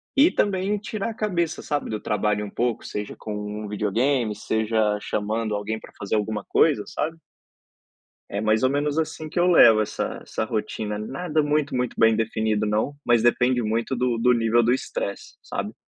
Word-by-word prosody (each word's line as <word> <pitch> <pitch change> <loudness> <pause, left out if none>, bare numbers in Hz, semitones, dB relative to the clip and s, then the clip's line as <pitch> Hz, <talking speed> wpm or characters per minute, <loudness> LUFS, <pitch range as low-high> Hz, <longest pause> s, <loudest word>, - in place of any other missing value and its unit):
e 285 +5 +6
também 200 +1 +1
tirar 215 +1 -4
a - - -5
cabeça, 175 -7 -1
sabe, 145 -1 -2
do 110 -1 -3
trabalho 105 0 0
um - - -7
pouco, 120 +1 -1
seja 105 0 -5
com 105 - -6
um 105 0 -5
videogame, 110 +3 0
seja 110 0 0
chamando 105 +1 -2
alguém 110 +2 -3
pra - - -14
fazer 100 +1 -1
alguma 105 -1 -2
coisa, - - +3
sabe. 160 +2 -3 1.1
É 100 - -2
mais 110 +1 +2
ou 130 - +3
menos 145 +2 0
assim 160 0 -3
que 165 - -3
eu 175 - +4
levo 115 -10 +7
essa 105 - -3
essa - - -3
rotina, 105 -1 -3
nada 150 +7 -1
muito, 150 -2 0
muito 125 -1 -1
bem 115 -1 +5
definido 110 -1 0
não, 110 +7 0
mas 120 -1 +3
depende 125 +1 +3
muito 115 +4 -1
do 125 -1 0
do 125 +2 +4
nível 115 0 +3
do 120 +1 +2
estresse, 110 -5 -3
sabe, - - -4
115 Hz, 180 wpm, -24 LUFS, 105-145 Hz, 1.1 s, levo